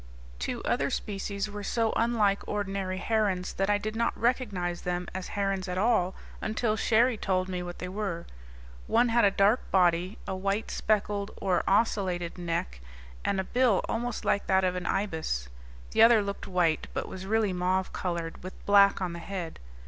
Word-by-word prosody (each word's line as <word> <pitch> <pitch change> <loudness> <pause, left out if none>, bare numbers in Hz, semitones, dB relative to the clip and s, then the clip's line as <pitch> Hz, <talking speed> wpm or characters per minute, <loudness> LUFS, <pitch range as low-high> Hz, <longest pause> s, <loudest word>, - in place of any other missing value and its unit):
Two - - -3
other - - +1
species 200 0 -3
were 205 0 -6
so 225 +2 0
unlike 220 -4 +2
ordinary 195 -2 -2
herons 200 -3 0
that 195 +1 0
I 205 - +4
did 215 +1 -4
not 235 +1 0
recognize 205 -8 0
them 180 0 -2
as 185 0 -4
herons 195 -1 0
at 180 0 -3
all 190 -3 +2 0.3
until 215 0 0
Cherrie 230 +2 +3
told 185 -1 0
me 180 -1 -3
what 175 0 -6
they 180 - -5
were. 185 -3 -3 0.6
One 240 +1 +3
had 235 +1 +3
a - - +6
dark 200 +4 +2
body, 180 +2 +2
a 190 - -2
white 195 +3 -1
speckled 205 -1 0
or 185 -3 +1
ocellated 190 -5 +1
neck, 165 - -3 0.4
and 195 - 0
a - - +1
bill 245 -1 +2
almost 235 0 -3
like 200 - +1
that 190 0 +3
of 185 -1 +2
an 180 -1 -3
ibis. 160 - -1 0.4
The - - +3
other 225 -2 +7
looked 200 0 -5
white, 175 -4 +1
but - - -2
was 190 0 -7
really 215 -2 +2
mauve 185 +1 0
colored, 170 -2 -3
with 185 +1 -8
black 200 -1 +5
on 175 -2 -2
the 170 - -6
head. 175 -2 -6
195 Hz, 180 wpm, -28 LUFS, 180-215 Hz, 0.6 s, other